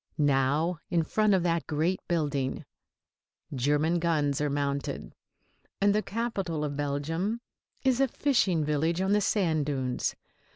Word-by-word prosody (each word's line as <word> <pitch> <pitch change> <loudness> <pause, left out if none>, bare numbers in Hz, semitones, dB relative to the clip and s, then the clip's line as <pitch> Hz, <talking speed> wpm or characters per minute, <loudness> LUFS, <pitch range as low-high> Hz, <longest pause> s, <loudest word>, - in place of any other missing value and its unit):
Now 145 +4 +2
in 170 -2 +2
front 215 +4 +2
of 180 - +1
that 170 -1 0
great 160 +5 0
building 145 -6 -1 0.9
German 150 +6 +1
guns 150 -4 +1
are 150 - +1
mounted, 140 -1 -2 0.7
and 200 +1 +4
the 210 - +2
capital 195 -8 -2
of 145 -1 -2
Belgium 155 +9 -1 0.4
is 260 -1 +3
a 270 - +4
fishing 205 - +1
village 155 +3 0
on 190 +1 +1
the 210 0 +4
sand 165 -8 +1
dunes. 130 -3 -1
160 Hz, 135 wpm, -28 LUFS, 145-190 Hz, 0.9 s, and